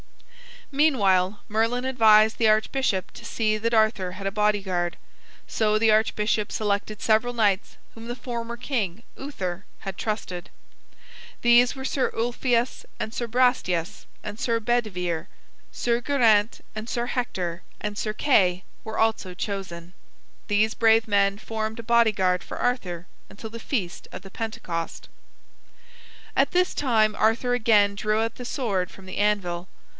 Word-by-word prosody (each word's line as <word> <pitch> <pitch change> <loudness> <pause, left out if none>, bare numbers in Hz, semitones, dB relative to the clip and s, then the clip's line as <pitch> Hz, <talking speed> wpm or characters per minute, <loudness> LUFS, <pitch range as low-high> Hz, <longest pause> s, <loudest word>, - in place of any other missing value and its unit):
Meanwhile, 205 -10 +2
Merlin 225 +3 +1
advised 220 -4 +5
the 225 - +3
archbishop 215 -2 +1
to 235 - -12
see 215 -2 0
that 230 +2 -1
Arthur 215 -5 +2
had 195 +1 -8
a 195 - 0
bodyguard. 195 -4 0 0.5
So 215 -1 +1
the 220 0 +4
archbishop 215 -1 +1
selected 210 0 -2
several 220 +2 +2
knights 205 -5 +1 0.2
whom 225 0 -10
the 240 - -4
former 235 -2 -5
king, 230 -5 -3
Uther, 195 -10 -5
had 195 -2 -6
trusted. 195 -5 -4 0.9
These 240 +1 +5
were 265 0 -6
Sir 270 0 0
Ulfius 240 +1 0 0.2
and 220 - -4
Sir 240 - -3
Brastias 215 -6 0 0.2
and 210 +1 -7
Sir 230 -1 +1
Bedivere; 185 -8 -1 0.5
Sir 235 -1 0
Geraint 230 -6 +3
and 220 +2 -6
Sir 240 0 -1
Hector 185 -9 -3 0.2
and 210 -1 -3
Sir 215 0 -2
Kay 190 -8 +2 0.2
were 220 0 -5
also 220 -4 +1
chosen. 180 -3 -5 0.5
These 215 +2 +2
brave 225 0 +4
men 200 -1 +2
formed 220 +1 -4
a - - -6
bodyguard 215 -6 +2
for - - -8
Arthur 180 -9 -2 0.2
until 220 +2 -9
the 230 - -7
feast 205 -8 -3
of - - -7
the 195 - -12
Pentecost. 175 -7 -5 1.3
At - - +3
this 360 +1 +2
time 220 -6 +2
Arthur 225 +3 +1
again 215 -4 +4
drew 215 +1 0
out 225 0 -2
the 245 - -8
sword 200 -9 -1
from 195 - -14
the 185 - -7
anvil. 190 -4 0
215 Hz, 145 wpm, -25 LUFS, 195-235 Hz, 1.3 s, advised